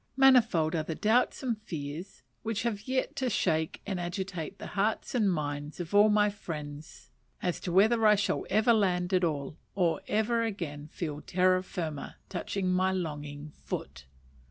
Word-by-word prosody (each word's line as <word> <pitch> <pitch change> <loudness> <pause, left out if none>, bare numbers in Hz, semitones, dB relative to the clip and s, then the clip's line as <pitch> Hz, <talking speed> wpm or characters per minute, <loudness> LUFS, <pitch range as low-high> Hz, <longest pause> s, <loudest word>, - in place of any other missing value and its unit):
Manifold 230 -12 +5
are 165 - +1
the 155 +1 -4
doubts 225 +8 +2
and 230 -4 -1
fears 155 0 -6 0.2
which 225 -1 -2
have 215 -2 -2
yet 260 +3 -1
to 260 -2 0
shake 160 -7 0
and 195 -3 -2
agitate 180 0 -4
the - - -8
hearts 210 +3 0
and 215 -6 +3
minds 145 -1 -3
of 175 +1 -5
all 205 +1 +7
my 210 0 +4
friends 155 -7 -7 0.3
as 180 -2 0
to 180 - -4
whether 220 +5 +4
I 210 - +7
shall 205 - 0
ever 220 +3 +4
land 180 -4 +1
at 185 -1 +3
all, 150 -2 -2 0.2
or 175 -4 +1
ever 220 +2 +1
again 165 -10 -4
feel 155 -2 -5
terra 185 0 +3
firma 160 -6 -5
touch - - -4
my 185 0 +2
longing 150 -4 -4
foot. 70 - -6
185 Hz, 165 wpm, -30 LUFS, 155-210 Hz, 0.3 s, all